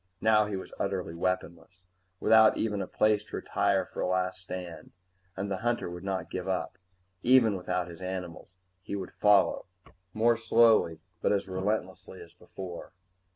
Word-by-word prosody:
Now 105 -1 +4
he 105 - -3
was 95 - -7
utterly 95 -4 -2
weaponless, 90 0 -4 0.4
without 110 +1 +5
even 105 -3 -1
a - - -4
place 105 -1 +2
to - - -8
retire 95 -2 0
for - - -7
a - - 0
last 90 0 -1
stand. 90 -2 -8 0.4
And 100 +1 -3
the 95 - -1
hunter 120 -4 -1
would 90 +1 -8
not 95 -1 -3
give 95 0 -4
up. 95 -1 -3 0.4
Even 120 -3 +5
without 90 -1 -2
his 85 0 -11
animals, 90 -3 -6 0.3
he 100 - -5
would 95 -2 -5
follow, 100 -2 +3 0.4
more 115 +3 +2
slowly 115 -8 +3 0.2
but - - +2
as 100 -2 0
relentlessly 95 -1 -3
as 85 - -13
before. 90 -2 -9
95 Hz, 160 wpm, -29 LUFS, 90-105 Hz, 0.4 s, without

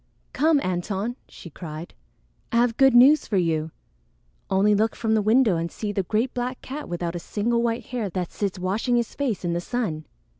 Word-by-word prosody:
"Come, 305 +2 +3
Antone!" 195 +5 -2
she 170 - -12
cried. 155 +1 -8 0.6
"I - - -2
have 235 -1 +3
good 270 -1 +5
news 275 +5 +6
for 205 - 0
you. 160 -3 0 0.8
Only 200 +2 +3
look 220 +2 +1
from 225 -1 0
the 220 - +3
window 220 -3 +3
and 170 +1 -3
see 210 -2 -4
the 200 - 0
great 220 +7 -1
black 250 +1 -3
cat 295 +3 -6
without 175 0 -3
a - - -3
single 230 +7 -1
white 235 0 -1
hair 235 -5 -3
that 180 -1 -4
sits 200 -2 -3
washing 200 +7 0
his 235 -1 0
face 240 -10 -2
in 170 - 0
the 170 - -1
sun. 175 -9 -3
215 Hz, 195 wpm, -24 LUFS, 180-240 Hz, 0.8 s, news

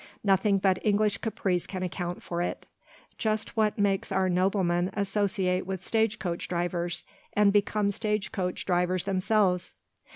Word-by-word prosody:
Nothing 195 0 +3
but 190 -1 +1
English 210 -1 +2
caprice 190 -5 -1
can 185 -2 -4
account 175 -1 -4
for 170 0 -3
it; 175 - -3 0.5
just 220 -1 -1
what 215 -2 +2
makes 200 -2 +1
our 190 -1 +2
noblemen 180 -1 +1
associate 195 -2 0
with 190 -1 -4
stage 220 -1 +1
coach 175 -4 -3
drivers, 175 -1 -2 0.3
and 205 -1 +4
become 205 0 +2
stage 210 -1 -1
coach 185 -4 -3
drivers 180 0 +1
themselves." 190 -1 +1
195 Hz, 140 wpm, -28 LUFS, 180-210 Hz, 0.5 s, and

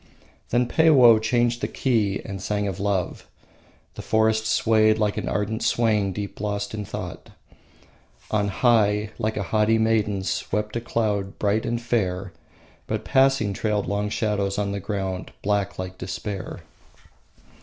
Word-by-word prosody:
Then 125 +1 +2
Peiwoh 130 -8 +6
changed 120 +1 +1
the - - 0
key 110 -7 0
and 100 -3 -6
sang 105 +1 -1
of 95 -1 -4
love. 100 -3 -2 0.7
The - - -7
forest 110 0 +2
swayed 110 -1 +3
like 105 -1 0
an - - -3
ardent 105 +2 -2
swain 105 -4 +2
deep 100 0 -6
lost 100 -1 -3
in 105 -1 -4
thought. - - -7 1.0
On 105 -1 +1
high, 105 -1 +2
like 110 -1 -1
a 105 - -1
haughty 105 +5 +2
maiden, 110 -3 +1
swept 105 +2 -2
a 115 - -1
cloud 105 -4 -1
bright 105 +1 0
and 120 0 -1
fair; 100 -6 -1 0.5
but - - -3
passing, 135 -6 +3
trailed 105 0 -1
long 100 +1 -1
shadows 105 -2 -1
on 100 -1 -1
the 100 - -3
ground, 95 -2 -4
black 100 -1 0
like 95 0 -6
despair. 95 +1 -5
105 Hz, 145 wpm, -24 LUFS, 100-110 Hz, 1.0 s, Peiwoh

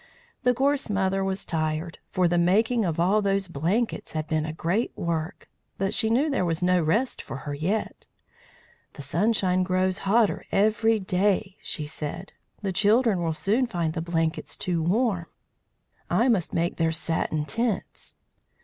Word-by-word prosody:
The 250 -2 +3
Gorse 280 0 +1
Mother 195 -1 +1
was 190 0 -2
tired, 160 0 -2
for 180 -1 +2
the 175 0 +2
making 220 +7 +3
of 165 -2 -2
all 195 +5 +3
those 195 -1 0
blankets 175 +10 -1
had 155 -1 -2
been 155 0 -1
a - - -3
great 170 +8 -1
work. 170 +1 -3 0.3
But 195 0 0
she 220 - +1
knew 255 +7 +3
there 275 -10 0
was 165 0 0
no 180 0 +3
rest 215 +12 0
for 135 - -7
her 145 - -3
yet. 180 +9 -2 0.9
"The 145 - -8
sunshine 185 - +1
grows 185 0 +1
hotter 215 +2 +2
every 220 +2 +3
day," 190 0 0
she 150 - -4
said. 155 +4 -6 0.3
"The 195 -2 -1
children 215 0 +3
will 165 -2 -1
soon 225 +9 +1
find 170 -7 -2
the 160 - -3
blankets 165 -1 -1
too 175 -2 -1
warm. 185 0 +1 0.8
I 250 - +3
must 195 -8 +1
make 170 +1 -1
their 165 -1 +2
satin 160 -1 -1
tents." 230 +2 -3
185 Hz, 160 wpm, -26 LUFS, 165-215 Hz, 0.9 s, The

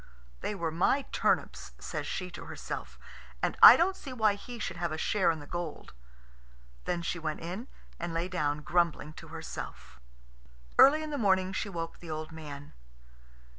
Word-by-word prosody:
"They 210 - -3
were 170 -4 -2
my 190 - +2
turnips," - - 0
says - - -5
she 180 -1 -4
to - - -9
herself, - - -6 0.5
"and - - +1
I - - +12
don't 370 +3 +2
see 280 - -9
why 220 -4 +3
he 240 +4 -8
should 205 - -4
have 170 -1 -2
a 155 - -3
share 195 +3 +2
in 165 - +1
the 145 - -10
gold." 175 -1 -6 0.9
Then 175 -1 -1
she 170 +1 -2
went 155 -1 -3
in, 185 +9 -5 0.3
and 175 0 -3
lay 165 +2 -1
down 150 -5 -1
grumbling 165 -2 +1
to - - -11
herself. 60 +1 -8 0.8
Early 305 +3 +8
in 310 - -5
the 290 - -2
morning 190 -3 +2
she 200 - -2
woke 165 -3 -5
the 170 - -11
old 155 0 -4
man. 145 -2 -9
175 Hz, 175 wpm, -30 LUFS, 160-205 Hz, 0.9 s, I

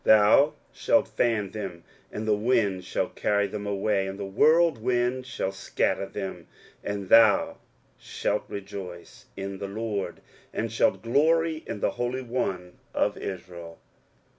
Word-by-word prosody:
23:041:016 - - -12
Thou 110 +8 +5 0.2
shalt - - +2
fan 110 -5 0
them, 95 -5 -6 0.3
and 110 +1 -5
the 105 - +4
wind 105 -4 +1
shall - - -2
carry 100 -1 +1
them 105 +1 -5
away, 100 -1 0
and 95 0 -5
the 100 - -4
whirlwind 125 - +2
shall 95 -6 -2
scatter - - -1
them: - - -6 0.4
and 100 -2 -4
thou 110 -3 +5 0.4
shalt - - -2
rejoice 100 +3 -8
in 95 0 -5
the 100 - -4
LORD, 105 -1 -4 0.3
and 115 0 -3
shalt 115 - +1
glory 160 +6 +2
in 105 - -5
the - - +2
Holy 125 +2 -3
One 95 -8 -3 0.2
of - - +1
Israel. 85 -3 -7
105 Hz, 140 wpm, -26 LUFS, 95-120 Hz, 0.4 s, Thou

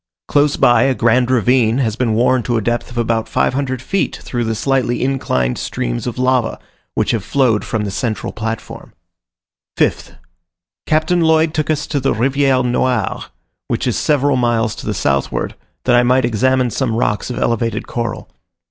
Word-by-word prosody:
Close 145 0 +2
by, 120 -2 +4
a 135 -1 +2
grand 120 +2 +2
ravine 125 -1 +3
has 115 -6 0
been 115 -2 0
worn 125 +2 +3
to 120 0 -1
a - - 0
depth 120 +2 -2
of 120 - -10
about 115 -1 0
500 130 -1 -1
feet 195 +6 -1
through 120 -2 -2
the 115 0 -1
slightly 125 0 0
inclined 65 - -1
streams - - -3
of 120 - -4
lava, 130 -1 +1 0.4
which - - +1
have 110 -5 -1
flowed 120 -3 +1
from 110 -2 -2
the 100 - -3
central 110 +3 -3
platform. 110 +1 -6 0.8
5th. - - 0 0.7
Captain 155 +3 +2
Lloyd 160 -1 +3
took 155 0 -1
us 150 -1 0
to 145 - -2
the 135 - 0
Riviere 135 +2 +2
Noire, 125 +1 0 0.4
which - - -2
is - - 0
several 145 -2 +2
miles 115 -3 +1
to - - -8
the 105 - -1
southward, 70 -5 -1 0.3
that 125 - +2
I 120 - +6
might 125 +1 +3
examine 125 +2 +1
some 120 -3 -1
rocks 105 -1 -1
of 125 - -4
elevated 115 0 -1
coral. 115 -3 -4
120 Hz, 175 wpm, -17 LUFS, 115-130 Hz, 0.8 s, I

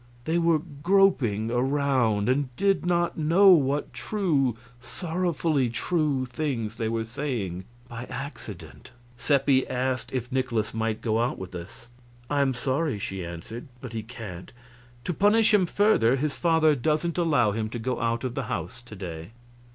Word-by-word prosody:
They 165 +2 +1
were 165 -1 +3
"groping 145 - +2
around," 125 -5 +1
and 130 +1 +1
did 195 +2 +1
not 175 -1 +1
know 170 +6 +5
what 145 -5 +3
true, 145 - 0 0.2
sorrowfully 160 -1 -1
true 145 +1 0
things 120 -4 -3
they 110 -1 -1
were 115 0 -1
saying 115 -8 -4 0.2
by 120 +1 -7
accident. 135 +1 -8 0.3
Seppi 135 +1 +2
asked 130 0 -2
if 125 0 -3
Nikolaus 120 -4 -1
might 110 -1 -2
go 110 -1 0
out 120 +2 0
with 95 -1 -8
us. 90 +6 -9 0.5
"I 145 -1 +2
am 135 -2 +1
sorry," 130 +1 -1
she 100 -3 -4
answered, 85 - -7
"but 125 -3 -8
he 110 - -3
can't. 105 -6 -9 0.5
To 175 - -2
punish 210 +5 +4
him 190 -4 +4
further, 170 - +3
his 145 +2 -2
father 160 -2 +3
doesn't 155 +6 0
allow 145 -11 +3
him 110 +1 -2
to 120 - -5
go 125 +2 -2
out 115 +1 0
of 130 -2 -2
the - - -3
house 95 +9 -4
to 120 -3 -12
day." 85 0 -7
130 Hz, 160 wpm, -26 LUFS, 115-155 Hz, 0.5 s, know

